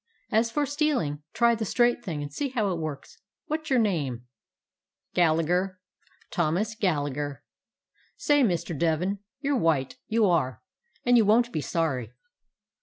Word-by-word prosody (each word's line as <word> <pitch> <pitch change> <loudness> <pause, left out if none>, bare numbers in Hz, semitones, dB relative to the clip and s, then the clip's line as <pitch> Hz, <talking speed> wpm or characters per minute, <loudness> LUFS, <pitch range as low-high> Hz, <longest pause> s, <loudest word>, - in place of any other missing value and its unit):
As 225 +2 +3
for 290 +5 0
stealing, 280 - 0
try 235 -1 +3
the 225 -1 -2
straight 240 +3 +2
thing 160 -8 -4
and 145 - -7
see 285 -2 -2
how 220 -6 0
it 170 - -2
works. 155 -3 -6 0.3
What 310 0 -3
's - - -5
your 265 - +3
name?" 150 - 0 0.9
"Gallagher. 175 +3 +2 0.5
Thomas 175 +6 0
Gallagher. 145 - -2 0.7
Say, 290 -1 +3
Mr. 175 -7 0
Devin, 170 +6 0 0.2
you 285 0 0
're - - +1
white, 150 -7 +1
you 225 -1 +3
are, 130 - +1 0.4
and 245 0 +5
you 225 - +5
won't 235 +4 +4
be 155 - -1
sorry." 140 -6 -1
185 Hz, 150 wpm, -27 LUFS, 155-235 Hz, 0.9 s, and